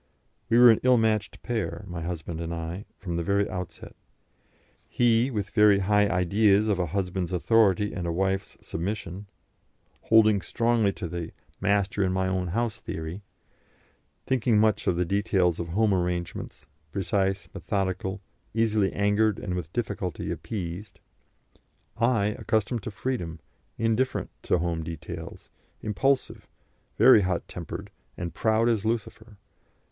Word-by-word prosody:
We 115 - +4
were 120 -1 +9
an 110 - +2
ill 130 -1 +5
matched 110 -2 0
pair, 110 -3 -3
my 90 -2 -5
husband 85 -1 -4
and 85 0 -4
I, 85 +4 -5
from 85 -3 -4
the 85 - -1
very 100 +3 +1
outset; 90 -2 -7 0.9
he, 120 +1 +3
with 105 -5 -3
very 105 -2 +5
high 105 +1 +3
ideas 100 +3 +3
of 100 -4 +1
a 90 - 0
husband's 90 0 -2
authority 105 +1 +3
and 90 -2 -3
a - - 0
wife's 95 +3 -1
submission, 100 +2 -4 0.8
holding 110 -3 +5
strongly 115 -2 +1
to 90 - -5
the 85 -1 -5 0.3
"master 100 0 +1
in 95 - +1
my 95 0 0
own 95 -1 -1
house 115 +5 -1
theory," 80 +5 -6 1.0
thinking 120 -4 +2
much 110 -1 +2
of 90 - +3
the 90 +1 +1
details 95 -2 +1
of 85 - -3
home 105 +4 +2
arrangements, 90 -1 -3 0.3
precise, 95 +2 -1
methodical, 95 -1 -2 0.3
easily 110 -3 +2
angered 105 +1 +2
and 90 - -4
with 85 -3 -4
difficulty 100 -6 -3
appeased. 95 -1 -6 1.0
I, 115 -2 +2
accustomed 110 +2 0
to 110 - -5
freedom, 100 -6 -4 0.4
indifferent 115 +3 0
to - - +3
home 85 -1 -1
details, 80 -1 -8 0.3
impulsive, 130 +6 0 0.5
very 130 -5 +7
hot 90 -2 -1
tempered, 85 -4 -7 0.3
and 85 -1 -4
proud 110 +1 +2
as 115 -4 +1
Lucifer. 110 -1 -3
100 Hz, 140 wpm, -27 LUFS, 90-110 Hz, 1.0 s, were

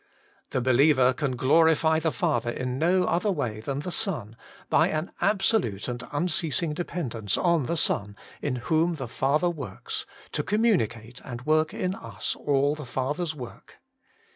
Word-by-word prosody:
The 130 - -1
believer 130 +1 +4
can 140 -2 -2
glorify 160 +4 +4
the 160 0 0
Father 155 -9 0
in 125 +2 -3
no 180 +3 +3
other 180 +5 +1
way 125 - -2
than 135 +5 -3
the 180 - -5
Son, 120 - -1 0.3
by - - +4
an 155 +4 -2
absolute 195 - +1
and 120 -1 -4
unceasing 160 0 0
dependence 125 - -2
on 170 -7 +2
the 170 - -1
Son, 100 -8 0 0.3
in 140 -3 -1
whom 160 +7 +1
the 135 -5 -5
Father 150 +9 +1
works, 135 - -5 0.2
to - - -1
communicate 125 - 0
and 120 0 -7
work 155 0 +3
in 185 0 -2
us 115 - -4
all 140 0 +1
the 150 -3 -7
Father's 145 +6 -2
work. 125 -5 -10
145 Hz, 155 wpm, -26 LUFS, 125-170 Hz, 0.3 s, believer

